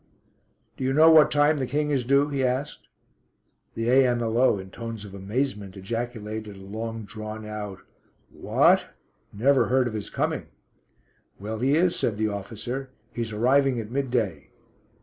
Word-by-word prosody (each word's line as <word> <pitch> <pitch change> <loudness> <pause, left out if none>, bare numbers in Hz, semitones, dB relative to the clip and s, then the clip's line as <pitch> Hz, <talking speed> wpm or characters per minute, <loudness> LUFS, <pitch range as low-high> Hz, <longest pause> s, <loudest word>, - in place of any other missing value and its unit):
"Do - - -4
you 130 +1 +1
know 160 +3 +7
what 155 -2 +7
time 150 +1 +3
the 130 - -1
King 150 +2 -1
is 135 -3 +1
due?" 140 +4 +3
he 140 -2 -1
asked. 130 +3 -2 0.9
The 115 0 -2
A.M.L.O. 120 -2 +3
in 95 0 -9
tones 115 -2 -6
of 100 - -11
amazement 100 -1 -3
ejaculated 110 0 -5
a - - -12
long 110 +3 -5
drawn 110 +1 -7
out 105 -2 -6 0.5
"What; - - +2 0.4
never 130 +6 +3
heard 130 0 +2
of 115 - -5
his 105 -2 -4
coming." - - -2 0.9
"Well, 110 +2 -5
he 135 +4 +2
is," 175 +1 +2
said 105 -3 -1
the 110 0 0
officer. 115 +6 -5 0.2
"He's 115 -2 -3
arriving 130 +4 +2
at 110 0 -7
midday." 125 -8 -1
115 Hz, 150 wpm, -25 LUFS, 105-135 Hz, 0.9 s, know